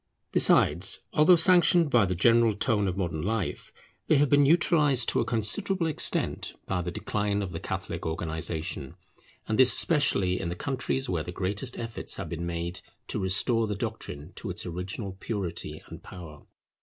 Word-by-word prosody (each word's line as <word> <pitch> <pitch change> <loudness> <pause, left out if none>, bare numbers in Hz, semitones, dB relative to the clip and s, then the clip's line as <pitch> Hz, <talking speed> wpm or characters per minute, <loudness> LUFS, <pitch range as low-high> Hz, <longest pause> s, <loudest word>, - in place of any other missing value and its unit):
Besides, 85 +6 +4
although 155 +4 +6
sanctioned 175 -2 +5
by 115 -5 +4
the 90 - -2
general 115 +3 +3
tone 105 -2 0
of 95 0 -3
modern 85 -5 -2
life, 100 +1 -3 0.4
they - - +4
have 145 0 +3
been 145 0 +5
neutralized 150 -3 +3
to - - +1
a - - 0
considerable 170 - 0
extent 160 -3 0
by 90 -2 -2
the 90 - -4
decline 105 +3 -2
of 95 - -5
the 80 - -5
Catholic - - -5
organization, 80 -2 -4 0.5
and 110 +1 -1
this 130 -1 +6
especially 100 - +1
in 85 - -3
the 85 - -4
countries 135 +3 -3
where 85 -6 -1
the 90 - -7
greatest 100 +7 -3
efforts 115 -1 -4
have - - -6
been 85 +1 -5
made 85 +2 -4 0.3
to - - -2
restore 110 +4 +1
the 105 - -3
doctrine 95 -7 -6
to 105 - -6
its 90 +3 -4
original 95 +3 -6
purity 100 -6 -4
and - - -11
power. 80 -5 -12
100 Hz, 170 wpm, -27 LUFS, 90-130 Hz, 0.5 s, although